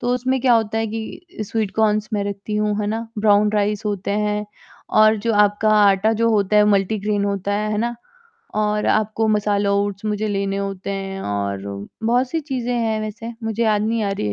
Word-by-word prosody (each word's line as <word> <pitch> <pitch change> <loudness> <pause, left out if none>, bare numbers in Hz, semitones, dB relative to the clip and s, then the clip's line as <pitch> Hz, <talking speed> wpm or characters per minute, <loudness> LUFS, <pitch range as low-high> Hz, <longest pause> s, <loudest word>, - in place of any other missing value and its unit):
तो 245 +1 0
उसमें 260 +1 0
क्या 250 -1 +4
होता 225 -1 +1
है 225 - 0
कि 220 +10 -6
अ, - - +1
स्वीट 215 -1 -2
कॉर्न्स 215 -1 +1
मैं 205 -1 0
रखती 200 +1 -4
हूँ, 210 0 0
है 210 - -1
ना? 225 +2 -2
ब्राउन 210 0 +4
राइस 210 +1 0
होते 200 -1 -2
हैं 210 0 0 0.6
और 215 0 +6
जो 225 +2 -1
आपका 205 +1 +3
आटा 200 +2 +3
जो 230 +1 +1
होता 210 -1 +2
है 210 - +6
मल्टीग्रैन 205 0 +1
होता 200 0 -1
है, 210 +1 -1
है 210 - -1
ना? 235 +1 -1 0.6
और 210 0 0
आपको 215 +1 +1
मसाला 205 -1 +1
ओट्स 200 0 -1
मुझे 210 0 -1
लेने 195 -1 -1
होते 195 -1 -4
हैं 195 0 -4
और 100 -1 -2 0.4
बहुत-सी 250 +7 +1
चीज़ें 260 -5 -3
हैं 225 -2 0
वैसे, 215 +2 -6
मुझे 225 +1 -1
याद 215 -2 +2
नहीं 225 +1 0
आ 200 - -1
रही 195 - -3
है 105 - -1
210 Hz, 205 wpm, -21 LUFS, 200-220 Hz, 0.6 s, और